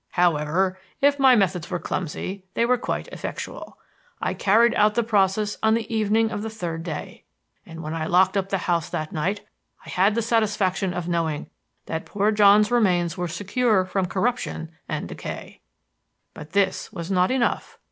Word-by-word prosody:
However, 175 +2 +1 0.2
if 285 0 +3
my 265 -2 +7
methods 185 -5 +1
were - - -1
clumsy, 185 +3 -4
they 235 - +2
were 250 0 +2
quite - - -3
effectual. - - -7 0.4
I - - -1
carried 230 +4 +4
out 210 0 +3
the 235 - +2
process 210 -1 +1
on 220 0 +4
the 230 0 -3
evening 220 +1 +2
of 205 - -3
the 220 - -4
third 175 -7 -5
day; 165 0 -6 0.4
and 165 0 -9
when 155 +1 -4
I 160 -1 -2
locked 185 +2 +4
up 195 -1 0
the 195 - +1
house 170 -3 0
that 155 0 -4
night, 190 +7 -1 0.4
I - - -10
had 195 +3 +2
the 230 - 0
satisfaction 205 -4 +1
of 175 -1 -3
knowing 165 -3 -2 0.3
that 160 0 -4
poor 205 +1 +1
John's 210 0 +5
remains 180 -8 +2
were 180 -1 -2
secure 205 +3 +1
from 185 0 -1
corruption 190 -5 -2 0.2
and - - -3
decay. - - -8 0.7
"But 155 +1 -11
this 195 -1 +1
was 170 +3 -6
not 185 -1 +3
enough. 255 -2 -1
195 Hz, 175 wpm, -24 LUFS, 175-220 Hz, 0.7 s, my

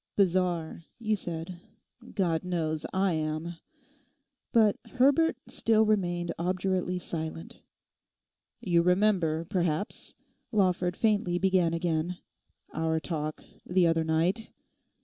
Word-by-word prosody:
'"Bizarre," 175 -4 +1
you 215 -2 0
said; 170 -2 -6 0.6
God 170 -5 +1
knows 160 -4 -2
I 190 -1 +1
am.' 155 +2 -3 0.9
But 220 -4 +4 0.2
Herbert 280 +6 +4
still 220 -1 +2
remained 175 -5 0
obdurately 185 +1 0
silent. 165 -2 -6 1.0
'You 170 -3 +3
remember, 180 -3 +2
perhaps,' 175 0 -2 0.4
Lawford 180 -4 +1
faintly 205 -5 +2
began 180 -3 +2
again, 170 +1 -1 0.6
'our 160 0 0
talk 155 0 -4 0.2
the 180 0 +2
other 165 -1 +2
night? 170 +8 0
175 Hz, 100 wpm, -29 LUFS, 165-195 Hz, 1.0 s, But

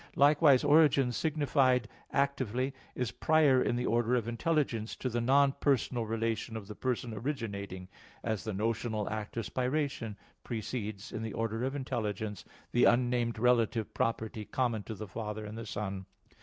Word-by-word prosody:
Likewise, 145 -1 +6
origin 145 -4 +5
signified 135 -4 +2 0.2
actively 135 -2 0 0.2
is 125 -3 -1
prior 150 -5 +4
in - - +1
the 125 +1 -1
order 120 +1 +2
of 115 -3 0
intelligence 120 -3 0
to 130 - -3
the 120 0 -1
non 135 +3 +4
personal 125 -4 +1
relation 115 0 -2
of 105 - -7
the 105 - -6
person 125 0 -2
originating; 100 -8 -4 0.4
as 110 -3 -2
the 110 - -3
notional 110 +1 -1
act 110 +1 -5
of 115 - -1
spiration 130 -4 -1 0.3
precedes, 110 -3 -4
in 110 - -4
the 110 -2 -4
order 115 +1 -2
of 135 +2 -1
intelligence, 110 -6 -3 0.3
the 120 - +4
unnamed 120 -1 +2
relative 115 -2 +2
property 110 -1 -1
common 115 -1 -1
to 110 +2 -7
the 105 +2 -7
Father 105 +1 -5
and 105 +1 -7
the 115 - -6
Son. 95 -2 -4
115 Hz, 155 wpm, -31 LUFS, 110-130 Hz, 0.4 s, Likewise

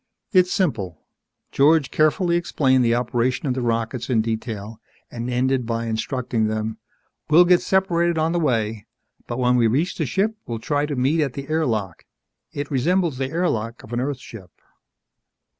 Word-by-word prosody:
"It's 180 -1 +4
simple." 100 - -1 0.5
George 145 0 +3
carefully 170 +3 +2
explained 135 -6 +2
the 115 0 +3
operation 125 +2 -1
of 130 - +1
the 130 - -3
rockets 115 +1 -2
in 115 -4 +2
detail 110 -1 -5 0.3
and 120 +1 -5
ended 125 0 0
by 115 0 -2
instructing 115 0 -1
them, 110 0 -3 0.5
"We'll 170 +4 +7
get 180 0 +5
separated 170 -3 +1
on 160 +1 +1
the 175 - 0
way. 115 -8 -1 0.4
But 120 - -4
when 125 -1 +2
we 115 -2 +4
reach 145 - 0
the 155 - 0
ship, 210 - 0
we'll 115 - -3
try 145 +5 -1
to 145 - -3
meet 135 +6 +1
at 140 -4 -1
the 140 +1 -7
air 155 -1 +1
lock. 105 -7 -3 0.5
It 145 0 -5
resembles 160 +1 +1
the 135 -1 -1
air 170 +4 0
lock 115 -1 -3
of 115 - -11
an 120 - 0
Earth 135 +1 -2
ship." 110 -7 -12
130 Hz, 175 wpm, -22 LUFS, 115-155 Hz, 0.5 s, We'll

